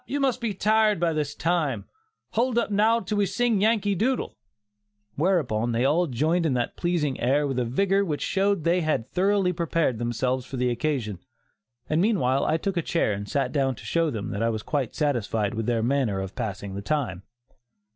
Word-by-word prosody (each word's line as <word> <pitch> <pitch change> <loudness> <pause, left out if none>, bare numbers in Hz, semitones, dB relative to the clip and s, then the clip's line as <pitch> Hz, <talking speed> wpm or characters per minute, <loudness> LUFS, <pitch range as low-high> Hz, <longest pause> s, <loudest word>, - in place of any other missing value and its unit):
you 285 - -2
must 260 -3 +1
be 230 -2 -1
tired 215 0 +2
by 170 -1 +1
this 150 -1 -2
time; 155 - 0 0.5
hold 240 +1 +1
up 235 - +1
now 220 +3 +3
till 205 0 -2
we 200 - +3
sing 235 -3 +1
'Yankee 210 -2 +2
Doodle,'" 245 +7 -1 0.8
whereupon 130 - +1
they 120 +3 +1
all 165 +5 +3
joined 155 +7 +1
in 150 -6 +1
that 120 -1 -1
pleasing 165 -6 -1
air 140 +5 +2
with 135 -3 -1
a 125 - 0
vigor 195 +11 +2
which 155 -6 -2
showed 200 +1 +2
that 170 - -9
they 180 +1 +2
had 155 -8 0
thoroughly 190 0 +2
prepared 165 -7 0
themselves 125 +2 -1
for 130 +1 -7
the 125 0 +1
occasion, 120 - -2 0.7
and 155 +2 +1
meanwhile 140 - +2
I 160 - +2
took 195 +2 -3
a - - +2
chair 160 -9 0
and 100 +1 -5
sat 135 -3 0
down 135 -3 +1
to - - -13
show 165 -1 +1
them 110 -7 -4
that 100 - -3
I 115 - +2
was 110 -2 -3
quite 135 -5 -2
satisfied 115 -7 0
with 115 -1 -3
their 115 -2 +1
manner 120 -6 +1
of 95 0 -5
passing 100 -2 -4
the 100 - -5
time. 120 - -2
150 Hz, 205 wpm, -25 LUFS, 120-195 Hz, 0.8 s, now